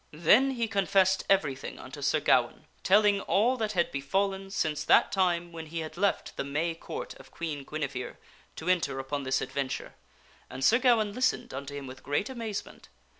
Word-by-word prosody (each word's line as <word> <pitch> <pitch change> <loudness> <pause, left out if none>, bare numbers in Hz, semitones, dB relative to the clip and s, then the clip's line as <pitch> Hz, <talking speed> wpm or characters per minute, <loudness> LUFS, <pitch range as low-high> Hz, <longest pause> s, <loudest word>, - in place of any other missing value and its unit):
Then 215 - +5
he 235 -1 -1
confessed 195 -2 +2
everything 150 -9 0
unto - - -10
Sir - - +2
Gawaine, - - +2 0.2
telling 205 0 +4
all 230 +8 +2
that 215 -2 -2
had 170 -2 +1
befallen 195 +8 -1
since 155 -6 -1
that - - +4
time 175 -3 +1
when 165 -1 -8
he 165 +1 -4
had 160 0 -7
left 200 +3 -1
the - - -1
May 150 +4 -1
Court 165 - -7
of 135 0 -14
Queen 150 -1 -5
Guinevere 140 -3 -4 0.4
to 160 - -8
enter 165 -7 +1
upon 135 +2 -3
this 130 -1 0
adventure, 135 0 -4 0.6
and 130 +1 -3
Sir 235 - +5
Gawaine 230 -5 +3
listened 255 +3 0
unto 140 +1 -6
him 140 -1 -6
with 130 0 -10
great 145 - -1
amazement. 225 -5 -6
170 Hz, 175 wpm, -29 LUFS, 140-200 Hz, 0.6 s, Then